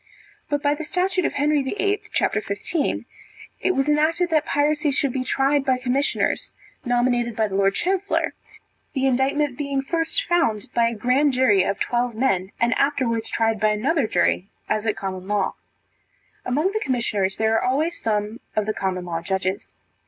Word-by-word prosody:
But 290 -1 -1
by 285 0 +3
the 295 - -5
statute 365 +3 0
of - - 0
Henry 295 0 +2
VIII. 400 +8 -1
c. - - +2 0.2
15, 280 - -2 0.5
it 370 - +1
was 270 +1 +1
enacted 320 +4 +2
that 310 -2 +2
piracy 295 +1 +1
should 280 -2 0
be 260 - -1
tried 275 +2 +2
by 260 -2 +2
commissioners 255 +2 0 0.3
nominated 240 -1 +1
by 220 -1 +1
the 195 - -8
lord 195 0 +2
chancellor, 385 +2 0 0.6
the 265 -1 0
indictment 270 +1 +1
being 280 -2 -1
first 330 - 0
found 310 -13 0
by 235 -1 +3
a 230 - -2
grand 260 +6 +2
jury, 250 -7 +4
of 190 +1 -1
twelve 240 -1 0
men, 195 -6 0
and 240 +2 +3
afterwards 250 -6 0
tried 225 -1 +1
by 215 +1 +3
another 255 +5 +1
jury, 180 0 +1 0.2
as 215 +1 -1
at 215 - 0
common 185 -1 -5
law. 205 -1 0 0.9
Among 300 +9 +1
the 435 +1 -2
commissioners, 215 -7 -1
there 220 0 +2
are 225 - +2
always 300 +7 0
some 210 +1 -1 0.2
of 215 - +1
the 215 - -1
common 185 -3 -2
law 165 -1 -3
judges. 190 +1 -2
255 Hz, 175 wpm, -23 LUFS, 215-295 Hz, 0.9 s, jury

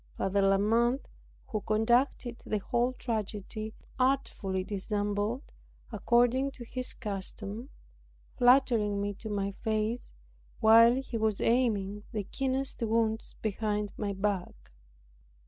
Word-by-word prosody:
Father 200 +1 +1
La 195 0 +4
Mothe 235 +6 +2 0.4
who 215 - -3
conducted 235 +3 +1
the 215 - -1
whole 240 +5 0
tragedy, 215 -2 -4 0.2
artfully 240 -8 0
dissembled, 205 +4 -2 0.5
according 245 +3 +2
to 270 -3 -10
his 255 +2 -4
custom; 205 +3 -5 0.7
flattering 245 -5 +4
me 205 0 -1
to 215 +2 -8
my 200 -1 -1
face, 220 +2 -1 0.5
while 230 +2 +7
he 260 -3 -3
was 215 -2 +1
aiming 210 -5 +1
the 210 -2 -2
keenest 265 +5 -1
wounds 225 -1 0
behind 210 -1 -1
my 205 -2 -2
back. 195 - -3
220 Hz, 110 wpm, -30 LUFS, 205-240 Hz, 0.7 s, while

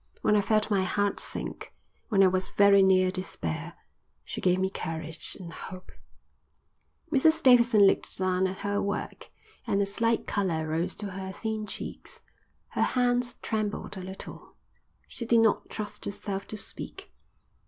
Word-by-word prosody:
When 210 - +4
I 205 - +4
felt 215 +1 +1
my 195 -2 +3
heart 205 +2 0
sink, - - -6 0.3
when 195 -3 +5
I - - +7
was 185 0 0
very 200 -1 +6
near 185 -1 +4
despair, 185 - -4 0.5
she - - -6
gave 180 0 +3
me 190 0 0
courage 160 -2 -5
and 170 -3 -8
hope." 185 +2 -9 1.2
Mrs 315 +4 +4
Davidson 235 -5 +6
looked 195 - +2
down 185 0 +1
at 185 0 -5
her 205 0 0
work, 200 0 -4 0.4
and 200 - +1
a 200 - +3
slight 230 +3 0
colour 170 -6 -1
rose 165 +4 -1
to 205 -2 -5
her 190 0 -5
thin 220 +1 -4
cheeks. - - -8 0.5
Her - - -2 0.2
hands 245 -1 +2
trembled 215 -2 -2
a 190 - -6
little. 190 +1 -10 0.5
She - - -6
did 230 -1 +5
not 220 -2 +2
trust 210 -1 -6
herself 200 -1 -4
to 215 - -6
speak. 195 - -4
200 Hz, 155 wpm, -28 LUFS, 185-215 Hz, 1.2 s, I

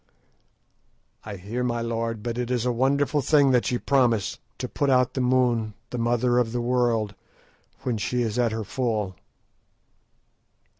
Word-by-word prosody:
"I 105 -1 -6
hear, 105 +7 -4
my 120 -1 -1
lord, 115 -1 -2
but 120 0 -3
it 125 -1 -2
is 125 -2 0
a 125 - +2
wonderful 140 +4 +1
thing 140 0 +4
that 125 -2 +2
ye 125 - 0
promise, 120 -7 +1 0.2
to - - -3
put 140 - -1
out 125 -2 +3
the 130 - -1
moon, 125 -4 +1 0.2
the 125 - -3
mother 120 +1 +2
of 115 -2 0
the 120 - -1
world, 120 -4 +1 0.7
when 120 -4 -1
she 125 +3 0
is 115 +1 -2
at 120 -2 +2
her 110 0 -3
full." 105 -5 -2
120 Hz, 160 wpm, -25 LUFS, 115-125 Hz, 0.7 s, thing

